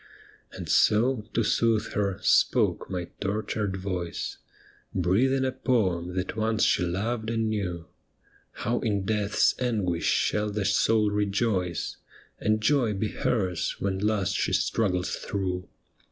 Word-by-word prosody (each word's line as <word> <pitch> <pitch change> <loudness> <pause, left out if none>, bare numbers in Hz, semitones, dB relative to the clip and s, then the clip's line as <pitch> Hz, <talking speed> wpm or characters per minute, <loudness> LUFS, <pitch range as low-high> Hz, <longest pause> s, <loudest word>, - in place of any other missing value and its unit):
And - - -7
so, 110 +1 +3
to 115 - +3
soothe 110 0 +1
her, 100 -2 0
spoke - - +3
my 90 -2 -4
tortured 105 -1 -2
voice, 90 -3 -4 0.6
Breathing 120 +10 +2
a 130 - 0
poem 90 -10 0
that 95 0 -2
once 110 0 +1
she - - +3
loved 110 +6 -2
and 115 -1 0
knew, 90 -6 -3 0.8
How 120 +2 +1
in 100 -4 -1
death's 105 0 +2
anguish 105 -9 0
shall 105 0 +1
the 105 -1 -2
soul 105 0 +3
rejoice, 100 -3 -1 0.4
And 110 0 +1
joy 120 -2 +2
be 105 +2 -1
hers 95 -8 -1
when 95 -1 -2
last 105 -2 +1
she - - 0
struggles 90 -5 0
through. 90 -3 -3
105 Hz, 130 wpm, -27 LUFS, 95-110 Hz, 0.8 s, so